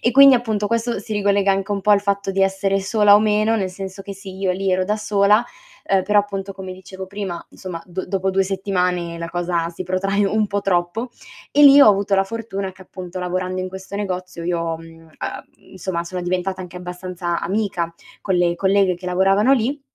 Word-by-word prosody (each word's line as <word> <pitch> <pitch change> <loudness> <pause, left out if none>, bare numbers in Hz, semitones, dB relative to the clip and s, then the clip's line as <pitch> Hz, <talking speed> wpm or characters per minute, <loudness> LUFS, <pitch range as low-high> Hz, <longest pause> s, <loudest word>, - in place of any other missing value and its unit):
e 240 - +2
quindi 275 +1 +8
appunto 220 -4 0
questo 230 0 -1
si 215 +2 -7
ricollega 200 -1 +2
anche 195 +1 -2
un 200 -1 0
po' 210 - +1
al 205 -1 +6
fatto 200 -1 -1
di 195 0 +1
essere 195 0 +1
sola 205 +1 +4
o 205 - +6
meno, 215 +1 +2
nel 190 -4 -1
senso 190 +1 -7
che 200 0 -7
sì, 195 -1 -10
io 190 -1 0
lì 190 +1 0
ero 185 - +2
da 210 +3 0
sola, 210 +1 +3 0.4
ehm, 195 -1 +2
però 205 +2 +3
appunto 200 -1 -2
come 190 -1 -7
dicevo 190 0 -9
prima, 190 -3 -5
insomma 180 -3 -7
d 185 +1 -5
dopo 190 0 -1
2 195 +1 +2
settimane 180 -3 -1
la 170 0 -5
cosa 170 -1 -1
si 175 +2 -7
protrae 195 +3 0
un 215 +1 +1
po' 205 0 -2
troppo, 195 +6 -1 0.4
e 295 - +4
lì 285 0 +9
ho - - +9
avuto 200 -1 +2
la 195 - +3
fortuna 200 -3 -5
che 185 - -15
appunto 185 0 -8
lavorando 185 +1 -2
in 185 - -3
questo 190 +1 -9
negozio 185 -4 -4
io, 170 -1 -1
mhmm, 165 0 -14
uhm, 165 -1 -19 0.6
insomma 185 -2 -3
sono 180 +1 -5
diventata 185 +1 -2
anche 180 -1 -9
abbastanza 180 -1 -4
amica 180 -3 -2 0.3
con 190 - -1
le 175 -1 +2
colleghe 195 -1 +2
che 180 +1 -10
lavoravano 195 +6 +3
lì, 270 +3 +1
195 Hz, 210 wpm, -21 LUFS, 180-205 Hz, 0.6 s, lì